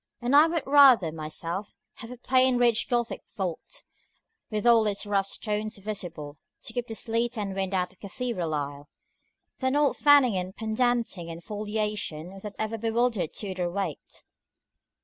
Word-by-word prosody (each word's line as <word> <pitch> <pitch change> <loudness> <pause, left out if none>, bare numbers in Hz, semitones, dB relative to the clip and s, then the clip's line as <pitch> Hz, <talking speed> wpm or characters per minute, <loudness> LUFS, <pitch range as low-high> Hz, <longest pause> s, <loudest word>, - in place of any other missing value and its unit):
And 245 +3 +1
I 300 +3 +8
would 330 -2 -1
rather, 270 - +6
myself, 165 +5 -5 0.2
have 230 - -9
a 250 - -8
plain 255 +1 +3
ridged 240 -1 +2
Gothic 240 -2 -1 0.2
vault, 190 - -5 0.7
with 215 -1 -3
all 230 -2 +5
its 205 0 -2
rough 200 -1 +1
stones 215 +1 -2
visible, 175 -8 -6 0.2
to 225 - -5
keep 245 0 -3
the 225 - -6
sleet 230 +2 -1
and 200 -2 -3
wind 190 0 -2
out 180 0 -1
of 185 - -31
a 200 - -8
cathedral 190 -8 -3
aisle, 145 0 -5 0.7
than 260 +1 0
all 295 -1 +4
the - - -10
fanning 285 -7 +6
and 185 +1 -3
pendanting 225 -5 -1
and 165 +1 -8
foliation 210 -5 -3
that 210 0 -8
ever 220 +1 -3
bewildered 225 -5 0
Tudor 185 -4 -3
weight. 195 +2 -5
215 Hz, 165 wpm, -27 LUFS, 185-240 Hz, 0.7 s, I